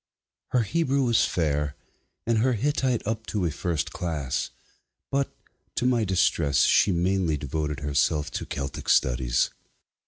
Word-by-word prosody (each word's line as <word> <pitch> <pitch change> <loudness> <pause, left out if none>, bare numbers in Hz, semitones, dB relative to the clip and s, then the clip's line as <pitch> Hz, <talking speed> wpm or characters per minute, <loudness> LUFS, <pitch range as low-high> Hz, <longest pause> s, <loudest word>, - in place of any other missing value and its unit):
Her 125 -2 +2
Hebrew 140 +2 +1
was 120 -3 +3
fair, 75 -3 -1 0.5
and 115 -1 +2
her 130 +3 +3
Hittite 130 0 0
up 110 +1 -3
to 100 -4 -1
a 80 - 0
first 80 +1 -2
class, 75 -7 -2 0.6
but, 140 0 0 0.4
to - - 0
my 120 -3 +2
distress, 85 -6 +2
she 100 - +4
mainly 90 -2 +1
devoted 75 +1 -3
herself 75 +1 +1
to - - -4
Celtic 70 -1 -5
studies. - - +2
90 Hz, 135 wpm, -26 LUFS, 75-115 Hz, 0.6 s, she